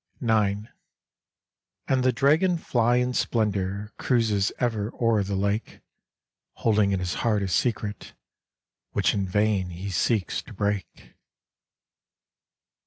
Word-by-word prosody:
IX. 105 -3 +2 1.3
And 130 -1 +2
the 130 - +4
Dragonfly 140 -6 +2
in 125 0 -1
splendor 105 -3 -1
Cruises 110 -6 +1
ever 110 -3 -1
o'er 115 -3 +3
the 100 +1 -3
lake, 100 +3 -2 0.7
Holding 105 -3 +2
in 95 - 0
his 90 -1 -2
heart 105 -4 +1
a - - -1
secret 105 +1 -2 0.8
Which - - +2
in 100 -2 -1
vain 105 -1 +1
he 90 +3 -6
seeks 95 -1 0
to 85 - -13
break. 100 -1 -3
105 Hz, 110 wpm, -26 LUFS, 100-115 Hz, 1.3 s, the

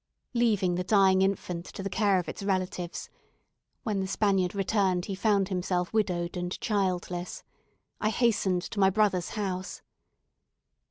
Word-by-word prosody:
Leaving 210 -7 +2
the 180 +1 -1
dying 190 -1 +4
infant 185 -3 -1
to 195 - -8
the - - -1
care 200 0 +2
of 180 - -2
its - - -6
relatives 185 -3 -2 0.8
(when 210 -3 -1
the 190 - -1
Spaniard 195 -2 +1
returned 190 -2 +1
he 200 - -4
found 200 -1 +2
himself 180 -1 -1
widowed 180 -5 0
and 180 0 -3
childless), 180 -4 -2 0.6
I 215 - +1
hastened 205 -6 +1
to 205 - -5
my 190 -1 +6
brother's 195 -3 +1
house. 185 -3 -3
190 Hz, 145 wpm, -28 LUFS, 180-205 Hz, 0.8 s, my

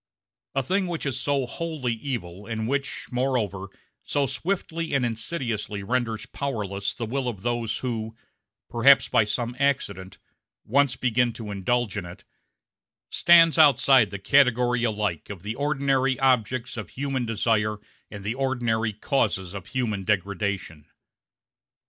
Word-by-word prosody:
A 135 - +1
thing 190 +7 0
which 170 -3 -4
is 135 -2 -1
so 140 0 0
wholly 140 -1 -3
evil, 105 -6 -5
and 110 -1 -3
which, 140 +2 -2
moreover, 120 -7 -1 0.3
so 145 -1 0
swiftly 165 +2 -2
and 130 -3 +2
insidiously 110 -4 -3
renders 115 0 -1
powerless 105 -8 -3
the 115 - -3
will 130 +3 -2
of 105 -5 -5
those 120 -2 -1
who 110 -2 -3 0.5
perhaps 135 +4 +5
by 110 - +4
some 120 +3 -2
accident 100 -10 -1 0.5
once 140 +1 +2
begin 120 -1 +1
to 110 -3 -7
indulge 105 +2 -1
in 95 - -3
it, 85 - -11 0.9
stands 165 -1 +6
outside 135 -6 +6
the 100 - -5
category 125 +2 +3
alike 105 -8 -1
of 95 -4 -8
the 105 +2 -3
ordinary 135 -1 +1
objects 130 -1 +1
of 110 -5 -6
human 135 -2 -2
desire 105 -1 +1 0.3
and 105 -2 -9
the 105 +3 -1
ordinary 120 -5 0
causes 100 - -1
of 100 -1 -7
human 115 -7 -2
degradation. 100 -5 -2
120 Hz, 135 wpm, -25 LUFS, 105-135 Hz, 0.9 s, stands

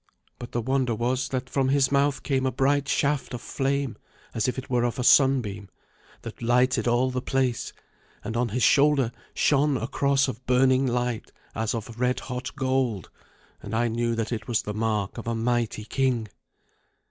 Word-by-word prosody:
But 120 - -8
the 120 - -1
wonder 130 -2 0
was 125 +3 -1
that 130 -1 -3
from 135 0 0
his 140 -1 +3
mouth 140 0 +1
came 135 -2 0
a - - 0
bright 140 +2 +1
shaft 140 -3 0
of 120 - -7
flame, 140 -2 -1 0.4
as 115 - 0
it 130 +1 -3
were 125 -2 +1
of 120 +2 -1
a 125 - -2
sunbeam, 120 -8 +3 0.5
that - - -9
lighted 125 +2 +2
all 120 +2 +2
the 125 0 -2
place, 130 -2 -1 0.5
and 110 - -5
on 120 0 0
his 120 +3 -1
shoulder 140 -4 +4 0.2
shone 145 -1 +2
a 115 - -3
cross 140 0 +2
of 125 -1 -6
burning 130 +1 +3
light 120 -2 -2 0.2
as 110 +2 -1
of 115 +1 -7
red 125 0 +1
hot 125 0 -6
gold, 130 -6 -1 0.5
and 105 - -5
I 120 +1 +1
knew 115 +1 -1
that 115 0 -2
it 115 -2 -4
was 120 -3 0
the 105 - -4
mark 110 -1 -1
of 115 - -8
a 115 - -1
mighty 115 -2 -1
king. 125 -4 0
125 Hz, 180 wpm, -26 LUFS, 115-135 Hz, 0.5 s, shoulder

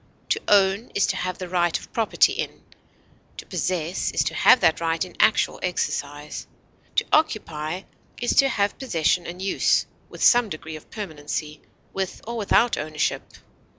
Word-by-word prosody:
To - - +1
own 200 +2 +3
is 200 - +3
to - - -1
have 185 0 -3
the 185 - -6
right 175 -2 +1
of - - -15
property 225 -2 +3
in; - - -5 0.7
to - - -8
possess 175 -1 -2
is - - +1
to - - -2
have 255 - +6
that 165 -2 +3
right 165 +1 0
in 180 - -14
actual 220 - +3
exercise; 150 -4 -3 0.5
to - - +2
occupy 180 - 0 0.4
is 240 - +1
to 275 -1 +6
have 205 -4 0
possession 175 - 0
and 175 +1 -7
use, 190 0 +2 0.2
with - - -6
some 240 -3 +5
degree 160 -2 -7
of 155 - -12
permanency, 150 -5 -5 0.3
with 190 -1 -3
or 235 +2 -5
without 230 +2 +2
ownership. 155 -1 -1
185 Hz, 160 wpm, -24 LUFS, 160-210 Hz, 0.7 s, have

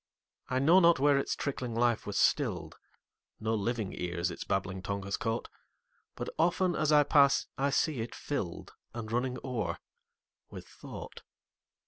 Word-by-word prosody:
I 130 - 0
know 160 +8 +6
not 170 -2 +6
where 140 0 +4
its - - -1
trickling 130 -4 -3
life 120 -2 +1
was 105 - -3
still'd; - - +1 0.7
No 110 +1 -1
living 110 -1 -1
ears 85 0 -2
its - - -6
babbling 95 -1 -2
tongue 100 +1 -3
has 100 +1 -2
caught; 115 -4 -2 0.7
But - - -5
often, 175 +1 +2
as 155 0 +1
I 150 -1 +7
pass, 140 -1 +4
I 140 +1 +1
see 140 -2 +1
it 115 - -6
fill'dAnd 110 -1 -6
running 125 +2 0
o'er 110 -10 -2 0.7
with - - -10
thought. - - -10
120 Hz, 150 wpm, -31 LUFS, 105-145 Hz, 0.7 s, I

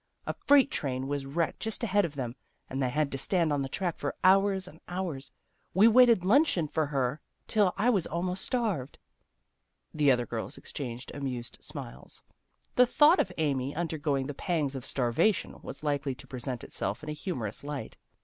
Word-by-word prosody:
A - - -2
freight 280 -1 +4
train 130 -2 -2
was 140 -1 -3
wrecked 165 +4 -1
just 225 +1 -3
ahead 205 -2 +3
of 155 -3 -6
them, 125 -3 -4 0.3
and 135 +1 -3
they 130 - +1
had 150 +2 0
to 135 - -3
stand 165 0 +2
on 145 - 0
the 135 - -3
track 175 +3 -2
for 145 - -3
hours 195 0 +4
and 160 -3 -13
hours. 175 -7 -4 0.4
We 205 +4 +7
waited 230 -5 +6
luncheon 210 - +4
for 155 0 0
her 135 0 -1 0.2
till 205 -4 +3
I 230 +5 +3
was 195 -7 +1
almost 180 +3 -2
starved." 210 - -1 1.0
The 150 -2 +3
other 125 -2 +3
girls - - -5
exchanged 125 -2 -7
amused 130 -4 -4
smiles. 65 +2 -8 0.5
The 250 0 +6
thought 305 +8 +6
of 185 - +1
Amy, 140 -3 0
undergoing 150 -5 -1
the 145 - -4
pangs 150 -3 -1
of 135 -1 -6
starvation, 130 - +1
was - - -9
likely 145 -2 -1
to - - -13
present 125 -1 -5
itself 100 +9 -3
in 155 - -6
a - - -2
humorous 145 - -4
light. 145 -5 -5
150 Hz, 180 wpm, -29 LUFS, 135-190 Hz, 1.0 s, We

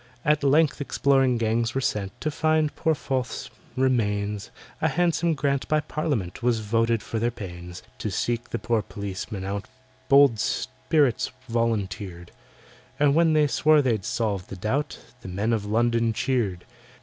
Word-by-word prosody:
At 150 -1 +3
length 145 +2 +3
exploring 135 -3 +2
gangs 115 +1 0
were - - +2
sent 100 -6 -2
To 155 - -1
find 155 0 +1
poor 160 -1 +1
FORTH'S 130 -5 -3 0.3
remains— 105 -6 0 0.3
A - - +3
handsome 170 -1 +1
grant 140 -1 0
by 155 - +2
Parliament 140 - -3
Was 120 -2 +1
voted 115 +1 +1
for 115 - -3
their 120 +2 +1
pains. 90 -6 -8 0.2
To 110 - -2
seek 120 +4 -2
the - - -2
poor 115 -2 0
policeman 100 0 -6
out 100 +1 -3 0.4
Bold 140 -5 +6
spirits 125 - 0 0.2
volunteered, 100 -6 -2 0.7
And 145 -1 +4
when 165 0 +4
they 155 -1 +4
swore 150 +1 +4
they'd 115 -6 0
solve 100 -5 -2
the - - -7
doubt, 130 +10 -2 0.2
The - - -9
Men 100 +5 -1
of 105 -2 -1
London 115 +1 +2
cheered. 110 -8 -1
115 Hz, 150 wpm, -25 LUFS, 105-140 Hz, 0.7 s, Bold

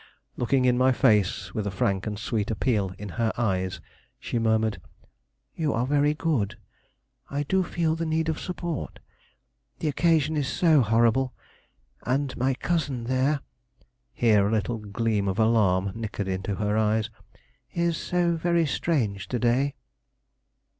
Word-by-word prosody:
Looking 125 +2 +1
in 125 0 +3
my 130 +1 +5
face, 100 -5 +2
with 105 -2 -2
a - - 0
frank 100 0 -1
and 105 -1 -3
sweet 105 -1 -2
appeal 105 -3 0
in 105 +1 -7
her 110 -1 +2
eyes, 95 -5 -1 0.4
she 120 - -2
murmured: 110 -1 +1 0.7
"You 155 -3 -1
are 115 +2 0
very 145 +2 +2
good. 120 -10 -1 0.7
I 140 +1 -1
do 190 +6 +1
feel 165 -2 0
the 165 - -3
need 160 0 0
of 160 -1 -1
support; 175 -4 -4 0.8
the - - -3
occasion 160 0 +2
is 145 -3 0
so 155 0 +4
horrible, 120 +3 +2 0.7
and 135 +2 -1
my 130 +1 +1
cousin 140 -6 -1
there," 130 +4 +1 0.7
here 105 -4 +3
a - - -1
little 110 +1 -1
gleam 105 0 -1
of 95 0 -1
alarm 100 -4 +3
nickered 110 -3 -4
into 95 +1 -2
her 105 +1 -1
eyes 110 0 +1 0.6
"is 170 -1 0
so 175 +1 0
very 170 0 +2
strange 115 - -1
to 125 - -2
day." 125 +4 +1
120 Hz, 145 wpm, -26 LUFS, 105-150 Hz, 0.8 s, my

